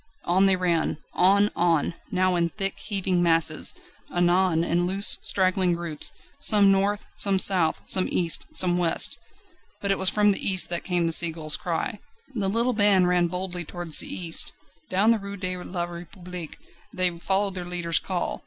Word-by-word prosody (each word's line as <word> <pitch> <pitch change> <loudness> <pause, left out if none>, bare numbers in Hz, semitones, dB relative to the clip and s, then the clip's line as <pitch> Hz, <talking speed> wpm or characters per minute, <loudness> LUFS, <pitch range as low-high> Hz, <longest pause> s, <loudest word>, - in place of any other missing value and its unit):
On 190 +3 +3
they 190 - +4
ran 170 -4 -1 0.2
on! 200 +3 +3
on! 170 -2 +1 0.2
now 185 -1 +1
in 170 -1 +1
thick, 195 +2 -3
heaving 190 -4 -2
masses, 165 -2 +1 0.4
anon 175 -1 +2
in 175 +1 0
loose, 195 +2 +3
straggling 185 -1 +1
groups 170 -3 -5 0.3
some 200 -2 +4
north, 200 +1 0
some 195 -1 0
south, 185 -4 +2
some 185 - +1
east, 170 -2 -1
some 175 -1 0
west. 170 -2 0 0.6
But 200 - -2
it 195 - -1
was 190 0 +3
from 210 -1 +2
the 195 - -3
east 190 -2 +4
that 175 -1 -3
came 175 -2 0
the 165 - +1
seagull's 160 -2 +3
cry. 180 +6 -4 0.3
The 200 -5 -1
little 235 +4 0
band 205 -4 +3
ran 175 -1 +2
boldly 180 0 -4
towards 175 -1 0
the - - -3
east. 170 -3 +3 0.4
Down 200 +5 +3
the 230 - +1
Rue 200 0 -8
de 185 -1 -3
la 180 -1 -5
République 175 0 -9 0.4
they 180 -5 0
followed 195 +2 0
their 180 -1 -6
leader's 175 -1 +1
call. 185 -2 -4
180 Hz, 170 wpm, -24 LUFS, 175-195 Hz, 0.6 s, they